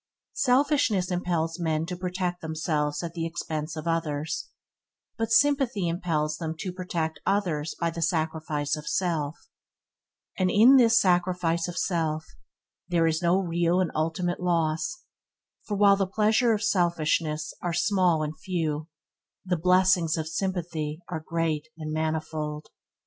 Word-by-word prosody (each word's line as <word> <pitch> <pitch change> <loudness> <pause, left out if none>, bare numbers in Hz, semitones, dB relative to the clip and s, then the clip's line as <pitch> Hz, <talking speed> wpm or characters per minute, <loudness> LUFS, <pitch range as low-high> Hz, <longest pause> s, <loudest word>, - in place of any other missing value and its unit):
Selfishness 255 -8 +2
impels 170 -2 -1
men 160 -2 0
to 180 +2 -4
protect 180 0 -3
themselves 155 -1 -1
at 170 -1 -5
the 170 -1 -3
expense 155 -2 -4
of 155 +1 -6
others; 160 -2 -2 0.7
but 225 0 -2
sympathy 250 - +3
impels 165 -3 -1
them 160 -1 -4
to 185 +3 -4
protect 170 -4 -3
others 170 -7 0
by 170 0 0
the 165 0 -6
sacrifice 155 -2 -1
of 150 -1 -9
self; 160 -4 -1 1.0
and 185 -1 +1
in 235 +8 +7
this 230 -2 +6
sacrifice 180 -2 +1
of 175 - -6
self 160 -4 -1 0.6
there 170 -2 +2
is 160 +1 +1
no 175 +1 +3
real 175 -1 +1
and 185 -3 0
ultimate 165 +3 -1
loss, 170 - 0 0.6
for 205 - -2
while 200 -1 +6
the 195 -1 0
pleasure 220 +4 +2
of 215 -1 0
selfishness 160 -5 0
are 175 - -1
small 175 -3 +2
and 155 +1 -5
few, 160 -6 -2 0.6
the 180 -1 +1
blessings 180 -1 +3
of 160 -1 -3
sympathy 165 -3 -3
are 160 -3 -4
great 160 -2 -1
and 155 -1 -5
manifold. 155 -1 -3
170 Hz, 140 wpm, -27 LUFS, 155-185 Hz, 1.0 s, in